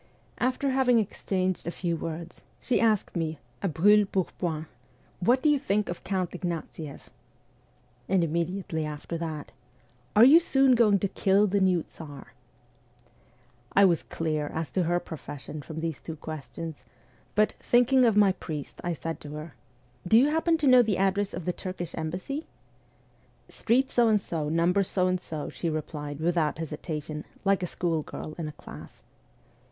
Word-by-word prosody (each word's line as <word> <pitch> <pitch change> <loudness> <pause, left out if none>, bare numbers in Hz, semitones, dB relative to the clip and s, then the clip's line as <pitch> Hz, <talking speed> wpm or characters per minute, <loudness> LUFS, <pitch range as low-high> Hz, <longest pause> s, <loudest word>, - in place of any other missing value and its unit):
After 260 +2 +1
having 260 -2 +4
exchanged 185 -4 -1
a 170 - -4
few 170 -2 -1
words, 165 +1 -6 0.2
she 250 - +1
asked 220 -3 +2
me 160 -2 -2 0.2
a - - 0
brule 200 +6 +4
pourpoint: 170 -4 -2 0.3
' - - -34
What 250 +2 +4
do - - +4
you 295 -2 +4
think 210 -6 0
of 175 - -5
Count 185 -3 -1
Ignatieff? 165 -4 -6 0.5
' 125 0 -35
And 190 -2 +3
immediately 170 0 -2
after 150 +2 -5
that: 155 -3 -5 0.3
' 120 +1 -35
Are 215 - +8
you 285 +7 +9
soon 270 -6 +4
going 220 -4 +5
to 200 - 0
kill 195 +2 +3
the 200 0 +1
new 185 -4 +3
Tsar? 145 -4 -11 0.7
' 120 0 -31
I 200 - +7
was 170 -4 +3
clear 155 -2 -2
as 160 +1 -4
to 185 -2 +1
her 175 +1 +2
profession 150 -2 -8
from 160 +3 -7
these 165 -3 -3
two 160 - -6
questions; 155 +1 -7 0.5
but, 215 +1 +4
thinking 245 +2 +4
of 225 -4 +4
my 205 -2 +6
priest, 155 -6 -7
I 175 -1 -1
said 165 +1 -5
to 145 0 -8
her: 150 0 -7 0.5
'Do 220 - +6
you 270 +5 +5
happen 325 +2 +2
to 300 -3 +1
know 255 -1 +8
the 215 -5 +1
address 195 +1 +1
of 170 -1 -6
the 180 - 0
Turkish 180 -2 -6
embassy? 180 - -4 0.3
' - - -35
' - - -35
Street 260 +4 +1
So 240 -1 +4
and 215 -2 +4
so, 160 -6 -3
number 170 +5 +3
So 185 0 +1
and 185 0 0
so,' 155 -4 -5
she 170 - -3
replied 150 -2 -4
without 165 -2 +1
hesitation, 155 -1 -5 0.2
like 195 0 +3
a 180 - -1
schoolgirl 160 -3 -3
in 160 - -3
a - - -5
class. - - -12
175 Hz, 175 wpm, -27 LUFS, 155-205 Hz, 0.7 s, you